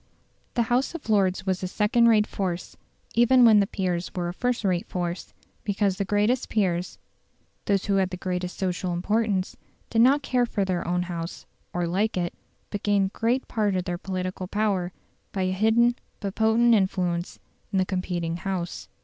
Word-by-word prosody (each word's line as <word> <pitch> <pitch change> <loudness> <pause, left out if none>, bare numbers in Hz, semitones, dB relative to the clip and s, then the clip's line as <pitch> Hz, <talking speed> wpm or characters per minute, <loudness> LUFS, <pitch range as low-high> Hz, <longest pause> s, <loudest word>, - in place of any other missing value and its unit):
The 240 - +3
House 245 +7 0
of 295 -8 -8
Lords 190 -2 +2
was 190 -1 0
a 185 - -2
second 210 +5 +3
rate 215 -2 +5
force, 185 -5 -4 0.4
even 240 +2 +6
when 220 -2 +7
the 200 - +2
peers 180 -3 -2
were 175 -1 -1
a - - -5
first 245 +3 -1
rate 185 -3 0
force, 175 0 -4 0.3
because 200 -2 0
the 200 - -1
greatest 210 +6 +1
peers, 180 -4 0 0.7
those 200 -2 +1
who 200 -1 +2
had 190 -1 +2
the 180 - -5
greatest 180 -1 -3
social 180 -1 -1
importance, 200 +1 0 0.4
did 225 - +3
not 275 +4 +5
care 250 -3 +1
for 200 -4 -1
their 185 -2 -2
own 180 0 +1
House, 170 -1 -6 0.3
or 175 0 -1
like 190 +5 0
it, 175 -1 -1 0.4
but 205 - -3
gained 200 -1 +1
great 240 +3 0
part 210 -4 0
of 185 - 0
their 175 -2 -3
political 185 -1 -4
power 200 -3 0 0.4
by 190 - -1
a 185 - 0
hidden 225 +5 +3 0.2
but 200 -2 -4
potent 225 +2 +4
influence 180 -4 0 0.3
in 195 - 0
the 185 - +3
competing 175 -3 -2
House. 180 -1 -4
195 Hz, 180 wpm, -26 LUFS, 180-220 Hz, 0.7 s, when